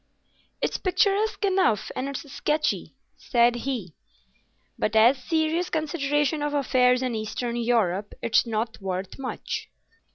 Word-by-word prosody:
"It's -, -, 0 dB
picturesque 405 Hz, +2 st, +1 dB
enough 375 Hz, -, +2 dB
and 265 Hz, +2 st, -2 dB
it's 280 Hz, +1 st, -6 dB
sketchy," 300 Hz, +3 st, -1 dB, 0.2 s
said 240 Hz, -1 st, +3 dB
he; 240 Hz, -, -4 dB, 0.8 s
"but 215 Hz, -, -1 dB
as 230 Hz, +5 st, +6 dB
a -, -, -17 dB
serious 320 Hz, +4 st, 0 dB
consideration 295 Hz, -2 st, 0 dB
of 295 Hz, 0 st, -1 dB
affairs 255 Hz, -2 st, +3 dB
in 250 Hz, -2 st, -1 dB
Eastern 225 Hz, +2 st, -3 dB
Europe, 220 Hz, -5 st, 0 dB
it's 235 Hz, +1 st, +3 dB
not 225 Hz, 0 st, -2 dB
worth 190 Hz, +4 st, -4 dB
much." 265 Hz, -, -5 dB
255 Hz, 130 wpm, -25 LUFS, 225-310 Hz, 0.8 s, as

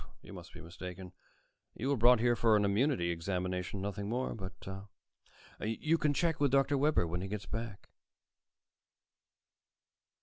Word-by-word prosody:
You -, -, -11 dB
must -, -, -10 dB
be -, -, -11 dB
mistaken. 90 Hz, +1 st, -8 dB, 0.6 s
You 130 Hz, +5 st, -2 dB
were 140 Hz, -, +3 dB
brought 120 Hz, 0 st, +6 dB
here 120 Hz, 0 st, +4 dB
for 115 Hz, -1 st, +4 dB
an 105 Hz, -1 st, +3 dB
immunity 100 Hz, -3 st, +2 dB
examination, 90 Hz, +2 st, -3 dB
nothing 100 Hz, 0 st, -3 dB
more. 125 Hz, +3 st, -1 dB
But 95 Hz, -3 st, -8 dB, 0.9 s
you 150 Hz, +9 st, 0 dB
can 150 Hz, -, +2 dB
check 165 Hz, -1 st, +1 dB
with 145 Hz, -1 st, +3 dB
Dr. 135 Hz, +2 st, +3 dB
Webber, 140 Hz, -, +3 dB
when 85 Hz, +2 st, -3 dB
he 95 Hz, -, -4 dB
gets 100 Hz, -1 st, -5 dB
back." 110 Hz, +2 st, -6 dB
105 Hz, 145 wpm, -33 LUFS, 90-130 Hz, 0.9 s, brought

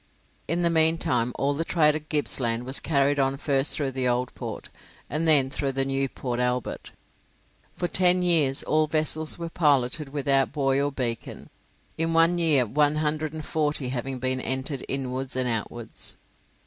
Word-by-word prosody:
In 170 Hz, +3 st, 0 dB
the 170 Hz, -, +2 dB
meantime 160 Hz, -7 st, +2 dB
all 140 Hz, +1 st, +1 dB
the 155 Hz, +4 st, -2 dB
trade 155 Hz, -3 st, +3 dB
of 155 Hz, 0 st, -6 dB
Gippsland 125 Hz, -5 st, 0 dB
was 130 Hz, +2 st, 0 dB
carried 145 Hz, -1 st, +1 dB
on 135 Hz, 0 st, +1 dB
first 135 Hz, -1 st, +2 dB
through 140 Hz, -3 st, -1 dB
the 130 Hz, -1 st, -1 dB
Old 125 Hz, 0 st, -1 dB
Port, -, -, -7 dB, 0.4 s
and 155 Hz, +2 st, 0 dB
then 140 Hz, -4 st, +5 dB
through 135 Hz, -1 st, -2 dB
the 135 Hz, 0 st, 0 dB
new 135 Hz, 0 st, -1 dB
Port 125 Hz, -2 st, -4 dB
Albert. 125 Hz, -1 st, -2 dB, 0.9 s
For 175 Hz, -, -2 dB
ten 180 Hz, +1 st, +4 dB
years 155 Hz, -6 st, +2 dB
all 155 Hz, 0 st, +1 dB
vessels 155 Hz, 0 st, -1 dB
were 170 Hz, -1 st, -6 dB
piloted 145 Hz, -2 st, +1 dB
without 135 Hz, -1 st, +1 dB
buoy 135 Hz, -2 st, +1 dB
or 145 Hz, 0 st, 0 dB
beacon; 120 Hz, -4 st, -4 dB, 0.5 s
in 165 Hz, 0 st, 0 dB
one 165 Hz, +2 st, +4 dB
year 150 Hz, -7 st, +3 dB
one 145 Hz, +6 st, +2 dB
hundred 155 Hz, 0 st, -1 dB
and 155 Hz, -1 st, -6 dB
forty 150 Hz, -4 st, -1 dB
having 130 Hz, +1 st, -3 dB
been 130 Hz, +1 st, -1 dB
entered 130 Hz, +1 st, -3 dB
inwards 130 Hz, -1 st, -3 dB
and 130 Hz, -1 st, 0 dB
outwards. 115 Hz, 0 st, -4 dB
140 Hz, 170 wpm, -25 LUFS, 130-155 Hz, 0.9 s, then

